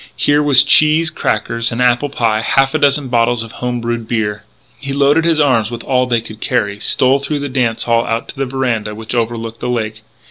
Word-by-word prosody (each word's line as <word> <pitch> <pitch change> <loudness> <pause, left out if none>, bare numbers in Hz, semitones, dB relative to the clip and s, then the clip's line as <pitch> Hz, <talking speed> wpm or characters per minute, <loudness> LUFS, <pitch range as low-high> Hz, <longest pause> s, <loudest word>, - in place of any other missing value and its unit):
Here 145 0 +2
was 140 -3 +5
cheese, 155 +3 +4
crackers, 115 +2 -2
an 115 - -4
apple 125 +3 +2
pie, 115 -5 0
half 135 +3 +1
a 155 - 0
dozen 145 -1 +2
bottles 120 -1 +1
of 115 - -11
home 125 0 -4
brewed 115 -1 -3
beer. 105 -3 -2 0.3
He 140 -1 -5
loaded 145 +3 +2
his 165 -2 +2
arms 125 -7 +2
with 120 -1 -7
all 125 -1 +1
they 120 -2 +1
could 110 -1 -11
carry, 100 -1 -1
stole 130 +5 +2
through 140 +2 -3
the 145 - -4
dance 125 -4 -1
hall 115 -1 +1
out 115 0 -2
to - - -8
the 135 -1 -3
veranda, 120 -5 -2
which 110 +1 -7
overlooked 115 -1 -3
the - - -4
lake. 110 -3 -3
120 Hz, 215 wpm, -15 LUFS, 115-140 Hz, 0.3 s, was